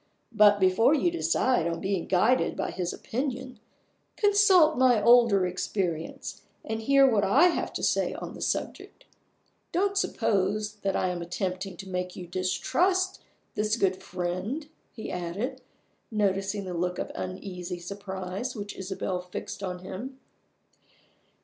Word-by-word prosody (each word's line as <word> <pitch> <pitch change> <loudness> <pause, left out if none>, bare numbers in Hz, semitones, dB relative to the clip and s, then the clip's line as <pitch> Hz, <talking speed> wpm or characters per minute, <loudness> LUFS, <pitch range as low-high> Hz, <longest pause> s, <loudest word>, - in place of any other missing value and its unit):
But, 210 -2 +6
before 190 +9 +4
you 340 +4 +2
decide 260 - +1
on 170 0 -2
being 190 -2 -2
guided 215 +8 +2
by - - -2
his 180 -1 -3
opinion, 255 -1 -4 0.6
consult 400 -6 +5
my 250 -3 +4
older 235 -4 +5
experience, 180 -2 -3 0.2
and 220 0 -3
hear 275 +3 +5
what 220 -5 +3
I 340 - +5
have - - -2
to - - -4
say - - +1
on - - -7
the - - -10
subject. - - -3 0.7
Don't 395 +3 +1
suppose 210 - 0
that 195 -2 -1
I 185 - +1
am 175 -1 -3
attempting 185 +1 -4
to 195 - -9
make 180 -1 -3
you 180 - -7
distrust 360 - 0 0.3
this 215 +1 0
good 190 -3 +1
friend," 185 - -3 0.2
he 220 - -7
added, 180 +7 -4 0.5
noticing 200 -1 0
the 180 - -5
look 180 +1 -1
of - - -4
uneasy 185 -1 -5
surprise 190 +5 -5
which 205 -1 -6
Isabel 190 -1 -3
fixed 180 +2 -7
on 180 -2 -5
him. 255 +9 -7
200 Hz, 140 wpm, -27 LUFS, 185-250 Hz, 0.7 s, But